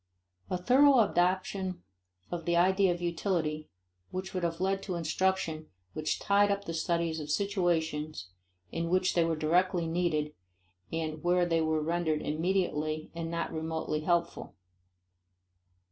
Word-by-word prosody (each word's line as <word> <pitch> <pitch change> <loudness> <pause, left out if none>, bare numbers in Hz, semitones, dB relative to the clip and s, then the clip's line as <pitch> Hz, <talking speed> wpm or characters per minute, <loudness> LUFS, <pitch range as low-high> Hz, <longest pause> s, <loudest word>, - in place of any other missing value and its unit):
A 180 - 0
thorough 260 +7 +5
adoption 185 -1 0 0.5
of 170 -2 -4
the 170 - +1
idea 190 +2 +4
of 175 0 -3
utility 165 -3 -1 0.4
would 185 +1 -3
have 170 -3 -2
led 195 +1 0
to 190 -2 -4
instruction 165 -1 -1 0.3
which 155 0 -1
tied 205 0 +3
up 200 0 -1
the 165 - -4
studies 165 -1 -1
to 150 - -6
situations 160 - -1 0.4
in 165 0 -2
which 185 +1 +2
they 170 - +3
were 165 0 0
directly 175 +3 +2
needed 165 -3 0 0.6
and 160 -1 -3
where 175 0 +3
they 165 -1 +1
were 160 -1 +1
rendered 160 -1 0
immediately 155 -2 -1
and 165 -1 -4
not 170 0 -3
remotely 160 -1 -2
helpful. 170 +2 -1
170 Hz, 135 wpm, -30 LUFS, 160-185 Hz, 0.6 s, thorough